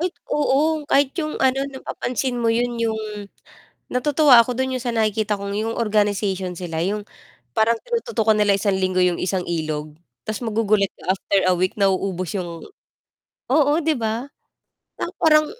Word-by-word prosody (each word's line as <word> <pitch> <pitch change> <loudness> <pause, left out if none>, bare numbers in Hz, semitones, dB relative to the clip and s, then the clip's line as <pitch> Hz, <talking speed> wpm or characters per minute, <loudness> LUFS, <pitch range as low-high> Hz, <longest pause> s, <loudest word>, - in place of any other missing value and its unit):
Ay, 355 - +1 0.2
oo. 300 +2 +2
Kahit 275 -1 +3
'yung 305 0 -3
ano 265 0 +2
napapansin 260 -1 -3
mo 230 - +1
'yun, 240 +1 0
yung 220 -1 0 0.9
natutuwa 275 -1 +5
ako 245 +1 0
do'n 260 0 -1
yung - - -8
sa 245 - -1
nakikita 215 -1 +1
kong 200 0 -5
yung 225 +1 -2
organization 205 -4 0
sila 165 -3 -5
'yung 205 +4 -1 0.5
parang 225 +1 +2
tinututukan 460 - +1
nila 205 -1 +4
isang 200 0 0
linggo 185 -1 0
'yung 180 -1 +2
isang 185 0 -1
ilog, 155 -2 -3 0.3
tas 215 -1 -3
magugulat 215 -3 +1
ka - - -15
after 195 0 0
a 180 - +4
week 185 +4 0
nauubos 190 -2 0
'yung 170 -2 -6 0.9
oo, 290 +1 +4
'di 315 0 +2
ba? 230 +4 -3 0.7
Pang - - -3
parang 305 -1 +5
220 Hz, 160 wpm, -22 LUFS, 195-260 Hz, 0.9 s, natutuwa